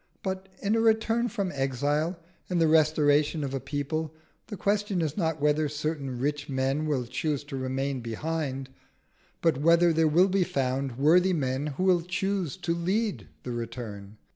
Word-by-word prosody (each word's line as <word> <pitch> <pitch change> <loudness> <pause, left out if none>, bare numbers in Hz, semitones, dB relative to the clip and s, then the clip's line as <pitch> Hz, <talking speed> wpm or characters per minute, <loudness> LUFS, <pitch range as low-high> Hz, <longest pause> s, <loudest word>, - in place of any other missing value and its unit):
But 190 0 -4
in 205 +2 +2
a - - +2
return 225 +1 +2
from 200 -4 -2
exile, 145 +5 0 0.3
in 180 - 0
the 165 -1 +4
restoration 155 -1 +3
of 135 -1 -3
a 135 - -1
people, 145 +4 -3 0.3
the 210 - -6
question 205 -1 0
is 155 -3 -1
not 160 -5 -1
whether 150 +1 +2
certain 150 -3 -3
rich 145 +3 -2
men 135 +3 0
will 135 -5 0
choose 140 +4 -2
to 145 -1 -7
remain 135 +1 -2
behind, 135 +3 -3 0.7
but 165 -5 +3
whether 170 +2 +5
there 160 0 +3
will 175 +5 +5
be 190 0 +2
found 135 -4 -2
worthy 175 +7 +4
men 135 -2 -1
who 185 - 0
will 185 -2 +4
choose 180 -2 -2
to 170 - -1
lead 195 +6 -1 0.2
the 125 - -5
return. 115 -3 -6
150 Hz, 165 wpm, -27 LUFS, 135-175 Hz, 0.7 s, whether